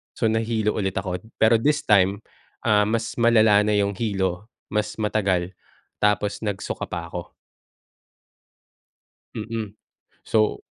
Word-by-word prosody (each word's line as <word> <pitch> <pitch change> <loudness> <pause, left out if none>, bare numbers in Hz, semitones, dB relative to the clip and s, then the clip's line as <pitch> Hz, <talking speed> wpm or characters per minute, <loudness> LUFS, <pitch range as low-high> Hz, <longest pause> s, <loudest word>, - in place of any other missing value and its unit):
So 110 - +1
nahilo 110 -1 0
ulit 95 -1 -2
ako, 95 -2 -2 0.2
pero 110 0 +4
this 150 +4 +1
time, 100 0 +3 0.4
ah, 105 -1 +3
mas 110 0 -1
malala 110 -3 +5
na 105 - +2
yung 100 0 +2
hilo, 95 -1 -2 0.2
mas 105 0 -1
matagal, 100 -4 0 0.5
tapos 105 0 +1
nag-suka 105 -3 -4
pa 85 -1 -6
ako. 85 -1 -5 2.1
Mm. 110 -2 -5 0.5
So 110 -1 +1
105 Hz, 115 wpm, -23 LUFS, 95-110 Hz, 2.1 s, malala